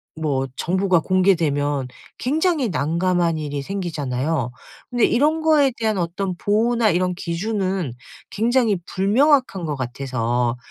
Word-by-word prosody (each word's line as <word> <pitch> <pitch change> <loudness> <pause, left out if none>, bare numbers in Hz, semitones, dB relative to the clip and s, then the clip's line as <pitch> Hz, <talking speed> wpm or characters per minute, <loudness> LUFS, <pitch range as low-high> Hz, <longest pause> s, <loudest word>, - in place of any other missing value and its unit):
뭐 145 -4 -1
정보가 185 0 +2
공개되면 155 -7 +1 0.3
굉장히 305 - +1
난감한 170 +1 0
일이 145 -2 -4
생기잖아요. 150 - -2 0.4
그런데 245 -2 +2
이런 300 +6 +2
거에 305 -4 +4
대한 220 -2 0
어떤 180 +2 -2
보호나 225 +4 +2
이런 180 +1 0
기준은 185 - -2 0.4
굉장히 230 -1 +2
불명확한 220 - +2
것 150 -2 -2
같아서 120 -2 -2
185 Hz, 285 characters per minute, -21 LUFS, 145-225 Hz, 0.4 s, 거에